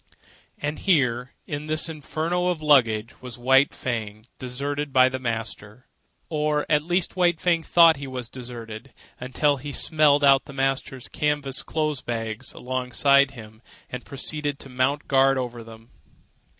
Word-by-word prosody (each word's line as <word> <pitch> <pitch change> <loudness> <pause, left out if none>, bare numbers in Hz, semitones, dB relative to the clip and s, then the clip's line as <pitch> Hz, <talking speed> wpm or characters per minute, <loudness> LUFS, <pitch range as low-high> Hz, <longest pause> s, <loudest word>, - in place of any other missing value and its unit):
And 150 +1 -4
here, 125 -9 +1
in 145 +1 -5
this 155 0 0
inferno 160 +3 -2
of 180 -3 0
luggage, 115 -6 +2
was 125 -3 -9
White 135 +3 +4
Fang 110 -3 -5
deserted 140 +3 -4
by 130 -1 +5
the 130 0 -4
master. 115 -1 -5 0.4
Or 150 -1 0
at 150 -1 +3
least 175 +3 -1
White 175 -3 +2
Fang 170 -2 +2
thought 165 -1 +5
he 140 0 -7
was 125 -3 -5
deserted, 120 -1 -9 0.2
until 140 +3 0
he 145 +2 -7
smelled 150 0 +3
out 135 -1 +5
the 140 - -11
master's 135 -1 -2
canvas 145 -3 -2
clothes 155 -4 -2
bags 115 -3 -4
alongside 130 +2 +2
of 135 - -17
him, 110 -1 -12 0.3
and 125 0 -6
proceeded 145 +1 -4
to 135 - -10
mount 130 +3 -1
guard 135 0 +4
over 120 -2 -4
them. 115 +1 -14
135 Hz, 150 wpm, -24 LUFS, 125-150 Hz, 0.4 s, by